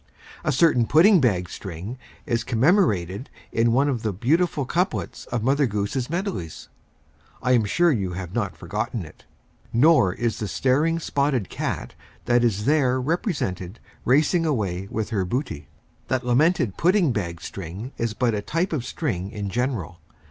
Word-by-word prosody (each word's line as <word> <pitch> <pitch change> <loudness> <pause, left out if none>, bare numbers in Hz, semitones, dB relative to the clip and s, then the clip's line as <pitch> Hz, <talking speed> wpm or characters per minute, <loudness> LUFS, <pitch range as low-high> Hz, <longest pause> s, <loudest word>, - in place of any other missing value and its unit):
A 155 - +1
certain 130 -5 +3
pudding 175 +5 +6
bag 95 -8 +1
string 95 +5 -7 0.3
is 115 -1 0
commemorated 115 - +1 0.2
in 115 +1 +2
one 135 +5 +3
of 130 -5 -1
the 110 - -1
beautiful 145 - +1
couplets 180 +8 -2
of 120 -3 -2
Mother 140 +2 +3
Goose's 105 +5 -2
Melodies. 170 - -4 0.7
I 125 - +2
am 120 -4 +4
sure 170 +12 +3
you 95 -9 -1
cannot 95 +3 -3
have - - -23
forgotten 105 +3 -3
it, 75 - -16 0.5
nor 120 - +4
the 115 -2 -2
staring 145 +9 +1
spotted 140 - 0
cat - - -4 0.3
that 120 0 +3
is 105 -3 +1
there 135 -4 +3
represented 125 - -2 0.2
racing 150 +6 +3
away 100 - -1
with 110 +1 -3
her 100 -4 +1
booty. 95 - -3 0.4
That 130 -1 -1
lamented 125 - +2
pudding 180 -3 +3
bag 85 -7 -3
string 95 +7 -7
is 115 -2 -1
but 120 -3 +1
a 105 - -1
type 165 - -1
of 140 -6 -1
strings 105 - -3
in 100 -2 -4
general. 105 - -2
120 Hz, 155 wpm, -24 LUFS, 100-150 Hz, 0.7 s, pudding